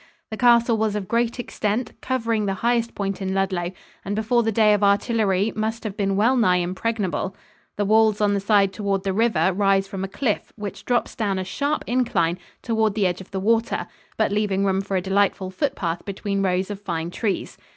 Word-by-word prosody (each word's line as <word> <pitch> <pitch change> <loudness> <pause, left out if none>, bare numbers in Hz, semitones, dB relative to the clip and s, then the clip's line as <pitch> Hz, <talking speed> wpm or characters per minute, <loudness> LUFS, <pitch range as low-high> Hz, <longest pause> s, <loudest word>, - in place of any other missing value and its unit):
The 220 - -4
castle 235 -1 +4
was 215 -1 0
of 200 -3 -3
great 235 +2 0
extent, 225 -1 -2
covering 230 -5 -1
the 195 - 0
highest 235 -1 +1
point 200 -1 -3
in 190 0 -2
Ludlow, 185 -2 -1 0.3
and 200 +1 -3
before 220 +3 +2
the 225 -1 0
day 215 0 +4
of 205 0 +1
artillery 205 0 +2
must 220 +1 -2
have 210 -3 -4
been 195 -1 0
well 230 +6 +3
nigh 215 -8 +4
impregnable. 190 +1 -2 0.4
The 205 - +1
walls 215 0 +4
on 205 -1 +2
the 200 - +1
side 200 -1 +3
toward 195 -1 -1
the 195 -1 -1
river 195 -5 +2
rise 195 0 +2
from 195 -1 -5
a - - -2
cliff 215 +2 -2
which 205 -2 -7
drops 245 -1 0
down 205 -4 -1
a 190 - -1
sharp 285 +11 -2
incline 180 -9 +1 0.2
toward 220 -3 +1
the 210 -3 +2
edge 180 0 -1
of 190 - -12
the 195 - -3
water 225 +3 +1 0.3
but - - +1
leaving 200 -2 +1
room 190 0 +1
for 195 -1 -2
a - - 0
delightful 195 0 +1
foot 280 +7 -1
path 170 -1 -3
between 200 0 -3
rows 185 +1 0
of 205 -1 -6
fine 170 -3 -3
trees. 200 -1 -3
205 Hz, 205 wpm, -23 LUFS, 190-225 Hz, 0.4 s, castle